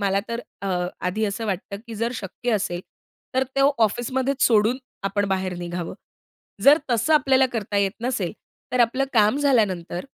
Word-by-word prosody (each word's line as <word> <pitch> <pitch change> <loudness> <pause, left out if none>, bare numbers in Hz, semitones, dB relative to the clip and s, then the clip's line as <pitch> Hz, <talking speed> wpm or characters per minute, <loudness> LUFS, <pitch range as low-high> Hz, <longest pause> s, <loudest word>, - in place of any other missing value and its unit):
मला 195 0 +2
तर 235 0 -3 0.2
अ, 195 - -2 0.3
आधी 205 +5 -1
असं 210 +2 -3
वाटतं, 200 0 -3
की 230 - -7
जर 230 +3 -1
शक्य 230 +3 -3
असेल 180 -4 -1 0.5
तर 260 - +3
तो 275 +1 +5
ऑफिसमध्येच 260 +5 -1
सोडून 225 +1 +3 0.3
आपण 200 +1 0
बाहेर 190 -1 -1
निघावं. 175 0 -4 0.7
जर 290 +3 +8
तसं 240 +6 +2
आपल्याला 265 -3 +4
करता 215 -3 -2
येत 200 -1 +2
नसेल 225 -8 -1 0.4
तर 250 - +2
आपलं 250 +3 +3
काम 215 +2 +4
झाल्यानंतर 205 -11 +1
215 Hz, 160 wpm, -23 LUFS, 195-250 Hz, 0.7 s, जर